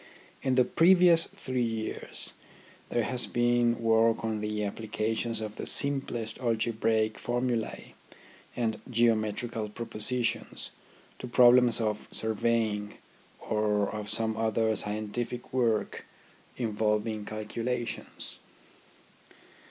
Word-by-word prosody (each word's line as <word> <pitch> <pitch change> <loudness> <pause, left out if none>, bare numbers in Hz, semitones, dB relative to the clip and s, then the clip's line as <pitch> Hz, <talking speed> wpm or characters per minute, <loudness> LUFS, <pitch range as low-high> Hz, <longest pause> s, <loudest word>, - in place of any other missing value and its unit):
In 130 -1 +1
the 125 -1 +4
previous 175 0 +5
three 130 -1 -4
years 115 -2 -2 0.6
there 120 - 0
has 125 +1 0
been 120 -1 +2
work 115 0 +3
on 110 -1 -2
the 105 0 -2
applications 110 +2 -2
of 105 -1 -6
the - - -5
simplest 135 -6 +2
algebraic 110 -2 0
formulae 120 -2 -2 0.6
and 110 -3 -2
geometrical 115 -1 0
pro 115 +3 -6
positions 120 +3 -1 0.5
to - - -6
problems 125 -1 +6
of 105 -2 -2
surveying, 110 -1 -1 0.5
or 105 -2 +1
of 105 -1 -4
some 110 +1 +2
other 110 0 +1
scientific 110 +5 -4
work 115 -4 0 0.5
involving 110 -1 -1
calculations. 115 +3 -5
115 Hz, 100 wpm, -29 LUFS, 110-120 Hz, 0.6 s, problems